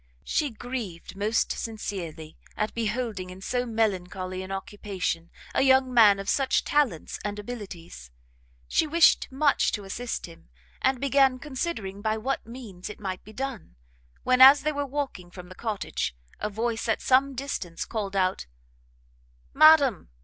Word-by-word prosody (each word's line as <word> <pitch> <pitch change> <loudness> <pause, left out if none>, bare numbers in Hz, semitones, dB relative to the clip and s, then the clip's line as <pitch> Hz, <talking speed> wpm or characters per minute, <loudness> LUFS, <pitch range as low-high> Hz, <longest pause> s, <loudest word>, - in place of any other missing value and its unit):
She 295 - 0
grieved 225 -8 -6
most 210 +3 0
sincerely 175 -8 -5 0.2
at 210 - -1
beholding 220 -4 -2
in 185 +1 -10
so 245 +5 -2
melancholy 185 -4 -1
an 190 +1 -7
occupation 195 -4 -4 0.2
a - - +2
young 265 -1 +4
man 215 -4 +7
of 195 0 -7
such 270 +3 +2
talents 275 - 0
and 205 0 -3
abilities; 195 - -8 0.6
she 320 - +2
wished 330 -2 +4
much 280 +1 +2
to 205 - -3
assist 230 +5 -4
him, 165 - -15 0.3
and 265 -1 +2
began 270 -1 +3
considering 255 - -4
by 220 +1 0
what 260 +2 -3
means 225 -7 -9
it 210 - -9
might 190 -2 -5
be 215 - -13
done, 250 - -6 0.5
when, 255 0 +3
as 275 +2 +9
they 305 - +1
were 285 -1 -3
walking 265 -10 -4
from 180 0 -11
the - - -9
cottage, 210 - -3 0.2
a 210 - -2
voice 225 +2 -2
at 225 - +2
some 270 +1 +3
distance 240 -11 -4
called 205 -4 -4
out 185 - 0 1.1
"Madam! 290 - +6
220 Hz, 150 wpm, -26 LUFS, 190-260 Hz, 1.1 s, as